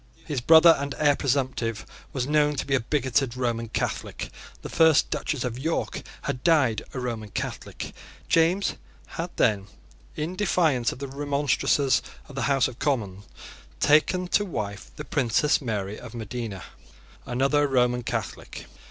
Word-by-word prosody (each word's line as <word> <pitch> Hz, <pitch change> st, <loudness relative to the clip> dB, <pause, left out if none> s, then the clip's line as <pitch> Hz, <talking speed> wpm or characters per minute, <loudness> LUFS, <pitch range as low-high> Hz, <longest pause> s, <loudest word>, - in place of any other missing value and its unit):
His 145 Hz, -6 st, -2 dB
brother 165 Hz, +4 st, +8 dB
and 140 Hz, 0 st, -3 dB
heir 145 Hz, -2 st, +4 dB
presumptive 130 Hz, -5 st, -1 dB, 0.3 s
was 130 Hz, -3 st, -2 dB
known 150 Hz, 0 st, +2 dB
to 135 Hz, -, -2 dB
be 135 Hz, -, -2 dB
a 135 Hz, -, +4 dB
bigoted 130 Hz, 0 st, 0 dB
Roman 115 Hz, -2 st, -1 dB
Catholic. -, -, -3 dB, 0.3 s
The -, -, -4 dB
first 160 Hz, -2 st, +4 dB
Duchess 140 Hz, -5 st, -2 dB
of 125 Hz, -1 st, -3 dB
York 160 Hz, +4 st, -2 dB, 0.2 s
had 125 Hz, -, -3 dB
died 145 Hz, -10 st, +3 dB
a -, -, -2 dB
Roman 115 Hz, -4 st, -4 dB
Catholic. -, -, -5 dB, 0.3 s
James 170 Hz, +4 st, +2 dB, 0.3 s
had 170 Hz, +2 st, -4 dB
then, 100 Hz, -3 st, +2 dB, 0.5 s
in 160 Hz, +4 st, -3 dB
defiance 165 Hz, -, +2 dB
of -, -, -8 dB
the 140 Hz, +1 st, -5 dB
remonstrances 140 Hz, 0 st, +1 dB, 0.3 s
of 145 Hz, -, -12 dB
the 135 Hz, -, -3 dB
House 135 Hz, -2 st, +3 dB
of 120 Hz, -, -10 dB
Commons, 105 Hz, -9 st, -1 dB, 0.5 s
taken 180 Hz, +5 st, +3 dB
to 205 Hz, -, +3 dB
wife 100 Hz, -, -5 dB
the -, -, -7 dB
Princess 125 Hz, +7 st, +2 dB
Mary 105 Hz, -5 st, -3 dB
of 125 Hz, -1 st, -10 dB
Modena, 110 Hz, -3 st, -5 dB, 0.6 s
another 140 Hz, +4 st, +2 dB
Roman 125 Hz, -2 st, +2 dB
Catholic. -, -, -5 dB
135 Hz, 150 wpm, -26 LUFS, 120-150 Hz, 0.6 s, brother